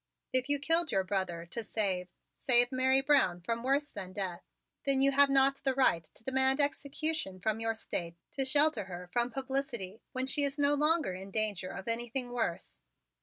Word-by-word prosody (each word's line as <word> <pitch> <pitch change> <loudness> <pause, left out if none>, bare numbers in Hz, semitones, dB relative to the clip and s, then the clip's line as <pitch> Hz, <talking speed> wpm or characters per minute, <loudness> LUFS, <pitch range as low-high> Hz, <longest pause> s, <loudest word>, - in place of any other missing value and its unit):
"If 255 +1 0
you 290 - +3
killed 330 +2 +2
your 190 - +1
brother 185 -3 -3
to 225 +7 -6
save 195 -5 -2 0.3
save 245 -1 +3
Mary 260 +1 +2
Brown 270 -11 +2
from 230 +6 -3
worse 280 +3 0
than 185 0 -8
death, 185 -3 -5 0.4
then 275 -1 +1
you 275 +1 +4
have 280 +1 +5
not 275 0 +3
the 265 -1 -2
right 255 -11 +2
to 190 - -12
demand 265 +2 +4
execution 285 -6 0
from 215 +3 -2
your 225 0 -2
State 170 -6 -4 0.2
to 270 - -1
shelter 275 -5 +5
her 180 -1 -9
from 240 0 +2
publicity 255 -6 -4
when 255 0 -3
she 285 +2 +2
is 280 +1 -1
no 290 0 +4
longer 300 - +2
in 190 +2 -9
danger 205 -3 -1
of 190 - -9
anything 240 +2 -3
worse. 225 - -4
250 Hz, 185 wpm, -30 LUFS, 195-275 Hz, 0.4 s, have